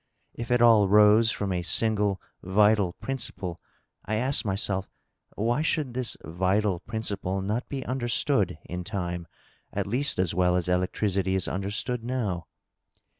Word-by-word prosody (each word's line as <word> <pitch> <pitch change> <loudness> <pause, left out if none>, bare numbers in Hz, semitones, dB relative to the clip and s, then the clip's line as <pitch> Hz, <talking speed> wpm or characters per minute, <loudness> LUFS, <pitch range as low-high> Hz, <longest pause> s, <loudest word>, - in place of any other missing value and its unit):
If 115 - -7
it 120 -1 +3
all 110 -4 +6
rose 105 +2 +6
from 100 -2 -2
a 90 -1 -1
single 105 +1 +2 0.2
vital 100 0 +3
principle, 110 -10 -4 0.4
I 110 - -2
asked 130 +5 +2
myself, 95 -1 -1 0.5
why 120 +7 0
should 150 -5 -1
this 125 -1 -1
vital 95 +3 0
principle 100 -2 -3
not 105 +6 -3
be 135 -2 -4
understood, 120 - 0
in 90 +1 -5
time, 90 -3 -4 0.4
at - - -2
least 130 +8 +1
as 90 -2 +1
well 90 0 +2
as 90 -1 0
electricity 95 +1 0
is 95 - 0
understood 100 +5 -2
now? 110 -9 -3
105 Hz, 140 wpm, -26 LUFS, 95-115 Hz, 0.5 s, all